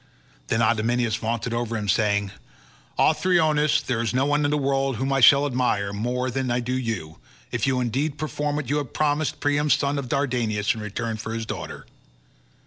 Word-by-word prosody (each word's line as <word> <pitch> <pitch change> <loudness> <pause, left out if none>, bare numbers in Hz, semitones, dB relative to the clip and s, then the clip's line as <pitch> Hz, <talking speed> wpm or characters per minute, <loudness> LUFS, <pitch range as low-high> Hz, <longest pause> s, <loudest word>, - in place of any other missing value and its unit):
Then 115 +1 +1
Idomeneus 115 +1 +1
vaunted 115 +1 -2
over 115 -1 -2
him 105 -1 -4
saying, 100 -1 +1 0.7
"Othryoneus, 155 -3 +3
there 120 -3 -1
is 115 +1 -2
no 130 +2 +2
one 145 +1 +1
in - - +2
the 150 - +1
world 135 -1 0
whom 135 +4 -1
I 135 - +2
shall 140 +2 +7
admire 120 -7 0
more 125 +4 -2
than 130 0 -2
I 120 +1 +1
do 125 +1 -3
you, 115 -11 -3 0.3
if - - -1
you 130 -1 +1
indeed 135 +5 -1
perform 150 0 -2
what 150 -4 -3
you 145 +4 0
have 145 -4 -4
promised 150 0 0
Priam 145 +1 +1
son 140 0 +2
of 130 -3 -6
Dardanus 120 -7 0
in 110 - -7
return 110 +2 -4
for 110 +1 -5
his 115 -1 -3
daughter. - - -6
125 Hz, 190 wpm, -24 LUFS, 115-145 Hz, 0.7 s, shall